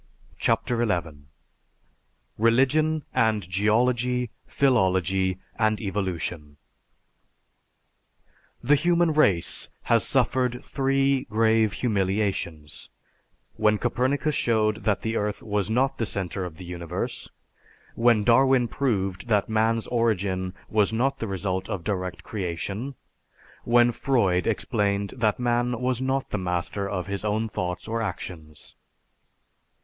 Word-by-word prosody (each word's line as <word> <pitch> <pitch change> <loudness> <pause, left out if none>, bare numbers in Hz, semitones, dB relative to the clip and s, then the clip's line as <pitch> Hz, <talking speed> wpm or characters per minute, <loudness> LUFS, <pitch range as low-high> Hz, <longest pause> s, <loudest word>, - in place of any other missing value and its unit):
CHAPTER 120 -1 +1
XI 85 -9 -2 1.1
RELIGION 135 +7 +3
AND 110 -5 +1
GEOLOGY, 120 +5 +1 0.2
PHILOLOGY 95 - +2 0.2
AND 110 -1 +2
EVOLUTION 90 -7 -4 2.1
_The 145 +4 +5
human 170 +1 +2
race 100 - +2
has - - +3
suffered 125 -1 +1
three 135 0 +1
grave 110 -1 +2
humiliations: 95 - -2 0.7
when 105 0 +3
Copernicus 130 +6 0
showed 110 -4 +1
that 105 -3 +1
the 110 0 -1
earth 105 -1 -2
was 105 -1 -1
not 130 +4 +1
the 115 - 0
center 95 -1 -3
of 80 -3 -8
the 90 - -9
universe; 85 0 -5 0.6
when 115 -2 +3
Darwin 125 +2 +4
proved 100 -7 -2
that 105 -3 +1
man's 110 +1 +1
origin 100 -6 0
was 105 -1 +2
not 125 +5 0
the 115 - -3
result 95 -1 -3
of 95 -4 -3
direct 95 -2 -3
creation; 100 +6 -4 0.7
when 120 0 +5
Freud 100 -8 +1
explained 100 -2 0
that 110 -4 +1
man 120 0 0
was 125 0 -1
not 135 +1 -1
the - - -1
master 90 +2 -2
of 90 -3 -3
his 100 +1 -4
own 110 +1 0
thoughts 90 -3 -4
or 115 +1 -2
actions_. 80 -7 -7
110 Hz, 115 wpm, -25 LUFS, 95-120 Hz, 2.1 s, The